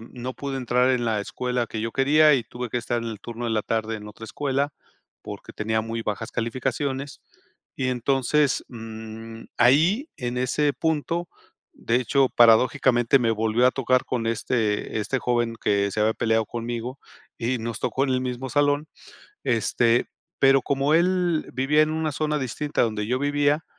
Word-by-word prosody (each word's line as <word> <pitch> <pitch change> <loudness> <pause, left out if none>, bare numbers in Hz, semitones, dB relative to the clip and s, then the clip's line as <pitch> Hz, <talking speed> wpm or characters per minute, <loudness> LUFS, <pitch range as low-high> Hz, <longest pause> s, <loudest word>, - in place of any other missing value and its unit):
no 125 +1 -5
pude 140 -1 -4
entrar 125 0 +2
en 125 -2 +1
la 110 -2 0
escuela 125 +2 -2
que 110 - -5
yo 115 - -2
quería 150 +3 +5
y 125 - +1
tuve 120 -2 -6
que 120 - -1
estar 120 0 -2
en 115 - -4
el 105 - -8
turno 120 0 -7
de 120 - -1
la 110 -1 +1
tarde 110 0 -2
en 105 0 -10
otra 105 +2 -10
escuela, 140 +4 -1 0.5
porque - - -9
tenía 110 +1 -1
muy 115 +1 -4
bajas 110 +1 -4
calificaciones. 130 +4 -3 0.6
Y 130 -1 -1
entonces, 135 +3 +1
mm, 115 -1 -9 0.2
ahí, 160 - +4
en 125 0 -3
ese 140 +3 +1
punto, 165 +3 -1 0.4
de 115 - -1
hecho, 130 +2 +2
paradójicamente, 120 +2 +4
me 120 -3 +1
volvió 110 +3 +2
a 130 - +3
tocar 130 -1 +1
con 115 -3 -2
este 110 -2 -1
este 135 +5 -1
joven 120 -2 0
que 100 -1 +1
se 105 +2 -3
había 110 +1 +2
peleado 110 -1 +1
conmigo 120 +2 -5 0.4
y 120 +2 -1
nos 115 -1 -4
tocó 135 - 0
en 135 - -1
el 130 0 +1
mismo 125 +1 -4
salón, 145 +2 +2 0.6
este, 115 +1 +2 0.3
pero 135 0 +6
como 140 +1 0
él 175 -1 +2
vivía 150 +4 +3
en 155 - 0
una 160 -1 -1
zona 150 +1 -1
distinta 145 +3 -1
donde 110 -2 -1
yo 125 +2 0
vivía, 145 +2 +1
125 Hz, 175 wpm, -24 LUFS, 115-140 Hz, 0.6 s, pero